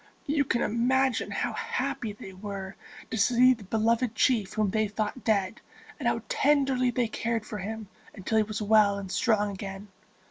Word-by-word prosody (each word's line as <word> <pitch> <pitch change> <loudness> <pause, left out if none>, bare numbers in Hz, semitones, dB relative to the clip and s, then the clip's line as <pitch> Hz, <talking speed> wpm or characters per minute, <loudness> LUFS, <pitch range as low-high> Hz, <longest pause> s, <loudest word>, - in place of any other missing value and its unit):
You 290 0 +1
can 240 -2 0
imagine 255 +3 +1
how - - -2
happy 280 - -3
they 200 -2 -10
were 195 0 -7 0.4
to - - -2
see 250 +4 +5
the 225 -4 -10
beloved 230 +3 +1
chief 225 -7 +2
whom 215 -3 0
they 215 0 +1
thought 215 +4 -3
dead, 205 -1 0 0.4
and - - -1
how - - 0
tenderly 275 - +2
they 240 -1 0
cared 225 0 -2
for 210 - -6
him 215 +2 -5 0.3
until 210 +3 -1
he - - +4
was 215 0 -4
well 210 -1 +4
and 195 -2 -6
strong 210 -4 +1
again. 195 +1 -7
220 Hz, 175 wpm, -28 LUFS, 205-250 Hz, 0.4 s, see